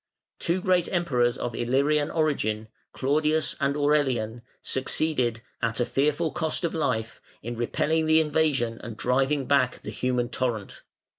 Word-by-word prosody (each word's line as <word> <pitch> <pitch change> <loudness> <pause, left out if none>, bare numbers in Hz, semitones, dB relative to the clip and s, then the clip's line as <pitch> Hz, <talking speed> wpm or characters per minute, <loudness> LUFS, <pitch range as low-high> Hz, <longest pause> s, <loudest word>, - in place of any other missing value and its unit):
Two 180 +2 0
great 180 -2 +2
Emperors 125 -9 +1
of 120 - -3
Illyrian 140 +6 +1
origin, 110 -9 0 0.2
Claudius 155 +3 +1
and 140 0 +1
Aurelian, 130 -6 +1 0.2
succeeded, 130 -4 0 0.2
at 115 +1 -1
a 120 - +2
fearful 150 +5 +1
cost 160 +2 -1
of 170 - 0
life, 120 -8 -2 0.2
in 120 +2 -4
repelling 155 +7 0
the 160 0 +5
invasion 145 -7 +1
and 115 -2 -8
driving 135 +4 +1
back 130 -2 +2
the - - -5
human 125 -1 -1
torrent. 120 -6 -3
135 Hz, 140 wpm, -26 LUFS, 120-155 Hz, 0.2 s, the